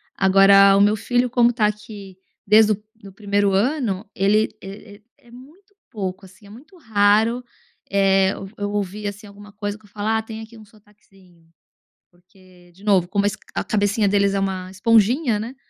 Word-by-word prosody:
Agora 195 +1 +5
o 200 - +3
meu 205 +1 +3
filho 245 +3 0
como 240 0 +2
tá 225 -3 +1
aqui 205 -3 -8 0.3
desde 215 +1 +5
do 210 +1 -9
do 200 -3 -15
primeiro 205 -1 0
ano, 215 -3 -1
ele 210 +3 +2
é 200 +2 -11
é - - -29 0.3
é 235 - -19
muito 320 +12 -17 0.2
pouco 190 -2 -6
assim, 190 +2 -19
é - - -16
muito 295 - -16
raro, 220 -1 +1 0.5
eh, 195 -1 +3 0.3
eu 205 0 -3
ouvir 205 0 -4
assim 205 +2 -8
alguma 205 +1 -15
coisa 205 0 -5
que 215 - -24
eu - - -21
falo 205 +1 -6
ah 220 0 +1
tem 220 0 -9
aqui 225 +1 -13
sotaquezinho. 195 -5 -25 0.6
Porque, 180 0 -23
de 195 +3 -20
novo, 190 -4 +2
como 200 +1 -1
a 205 - +3 0.3
a - - -5
cabecinha 205 0 0
deles 200 -1 +1
é - - 0
uma 190 -1 -3
esponjinha, 230 - +2
né, 235 +5 -7
205 Hz, 180 wpm, -21 LUFS, 195-220 Hz, 0.6 s, Agora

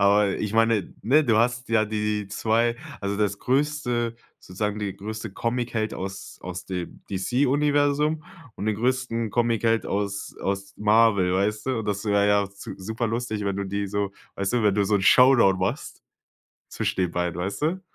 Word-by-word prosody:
aber 100 0 +4
ich 105 -1 -2
meine 115 -2 +2
ne, 145 +8 +4
du 115 -5 +3
hast 125 +2 +1
ja 110 -1 +3
die 105 -1 -2
2 115 +3 +1 0.2
also 100 0 -2
das 100 -1 0
größte 125 -4 0 0.2
sozusagen 105 +3 -3
die 100 -2 -3
größte 110 0 -6
Comicheld 115 -1 -2
aus 95 0 -7
aus 90 0 -7
dem 90 -2 -6
DC 120 +8 +1
Universum 145 +2 +2 0.3
und 105 - -5
den 110 -1 +1
größten 120 -2 -1
Comicheld 115 0 +1
aus 100 0 -3
aus 100 0 -3
Marvel, 105 -3 +4
weißt 105 +3 0
du? 130 -3 0
Und 110 - -6
das 100 0 -2
wäre 100 -1 +3
ja 100 -1 +3
zu 100 - -9
super 110 +5 -3
lustig, 115 -2 -2
wenn 100 -1 -1
du 100 - -2
die 100 +1 -2
so 100 0 -2 0.2
weißt 100 0 -1
du, 120 - +2
wenn 105 -2 +3
du 100 -1 +2
so 105 - +1
'n 100 - +2
Showdown 120 -3 +6
machst 95 - -3 0.7
zwischen 95 - -1
den 90 - 0
beiden, 90 0 -2
weißt 95 +8 -3
du? 180 +5 0
105 Hz, 180 wpm, -25 LUFS, 100-120 Hz, 0.7 s, Showdown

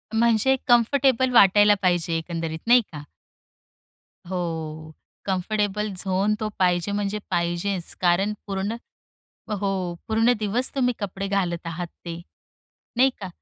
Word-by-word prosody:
म्हणजे 235 +3 +3
कंफर्टेबल 255 +1 +3
वाटायला 205 -1 +6
पाहिजे 175 -2 +1
एकंदरीत, 165 -1 -4
नाही 245 0 +7
का? 150 -1 -8 1.2
हो. 160 -3 -5 0.3
कम्फर्टेबल 205 +2 -1
झोन, 190 +2 0
तो 215 -1 -2
पाहिजे 180 +1 +2
म्हणजे 205 +1 -2
पाहिजेच. 175 +1 -1
कारण 185 +4 +2
पूर्ण 195 +3 -2 0.9
हो. 190 -3 -2
पूर्ण 225 +2 +3
दिवस 220 +4 +1
तुम्ही 250 -2 +1
कपडे 195 -1 -4
घालत 175 -4 -1
आहात 170 +1 -4 0.2
ते, 170 0 -6 0.8
नाही 265 +2 +5
का? 190 - -5
195 Hz, 115 wpm, -24 LUFS, 175-215 Hz, 1.2 s, नाही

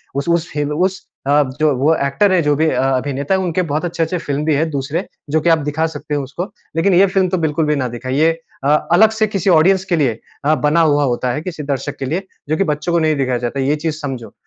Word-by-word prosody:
उस 140 +4 -2
उस 170 -1 0
हिल 145 0 -1
उस 185 +4 -1 0.2
अ, 145 +1 +4 0.2
जो 155 -1 +3
वो 145 +5 +3
एक्टर 150 +9 +1
है 185 - +3
जो 150 -2 +2
भी 160 +2 +2
अ, - - 0
अभिनेता 135 +4 0
हैं 190 - 0
उनके 180 -1 0
बहुत 155 +4 -1
अच्छे-अच्छे 170 0 -1
फ़िल्म 145 -3 -3
भी 155 - +2
हैं 160 +3 0
दूसरे 145 +6 -3 0.2
जो 155 +2 +1
कि 170 - +2
आप 165 - +5
दिखा 160 +2 0
सकते 150 0 -4
हो 145 - -1
उसको। 170 +9 -6 0.2
लेकिन 175 +4 +2
ये 190 +3 +6
फ़िल्म 190 -1 +1
तो 185 - 0
बिल्कुल 155 +1 0
भी 150 0 +1
ना 130 -3 -1
दिखाईए 135 +7 +1 0.3
अ, - - 0 0.2
अलग 215 +6 +6
से 215 - +3
किसी 195 -2 -1
ऑडियंस 185 +3 +4
के - - +5
लिए 130 -8 0 0.3
अ, 155 +1 +4
बना 150 +3 +2
हुआ 145 -2 +3
होता 125 -1 0
है 150 - -3
किसी 165 -3 -6
दर्शक 140 0 -3
के 135 - -3
लिए 180 +8 -3 0.2
जो 155 - +1
कि 195 - +2
बच्चों 170 +4 -3
को 170 - +3
नहीं 155 -1 +2
दिखाया 130 -3 0
जाता 120 +3 -3
है, 135 - 0
ये 145 - +2
चीज़ 155 0 -3
समझो।" 130 -7 -6
155 Hz, 260 wpm, -18 LUFS, 140-170 Hz, 0.3 s, ये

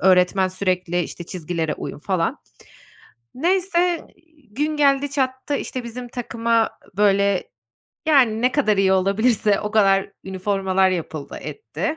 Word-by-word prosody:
öğretmen 185 +1 +4
sürekli 185 -2 -1
işte 170 +2 -7
çizgilere 165 -2 -3
uyun - - -7
falan. 175 0 -1 1.0
Neyse, 355 +2 +1 0.4
gün 300 +5 -1
geldi 280 -1 +3
çattı 260 0 -1
işte 255 -3 -4
bizim 245 +1 -7
takıma 230 -2 0 0.3
böyle, 200 -1 +2 0.6
yani, 245 -7 +4
ne 250 0 +3
kadar 215 -8 +2
iyi 190 -1 +3
olabilirse 200 +2 +2
o 210 - -3
kadar 195 -2 +3
üniformalar 190 0 +1
yapıldı 160 -4 -5
etti. 325 -7 -4
210 Hz, 120 wpm, -22 LUFS, 190-260 Hz, 1.0 s, öğretmen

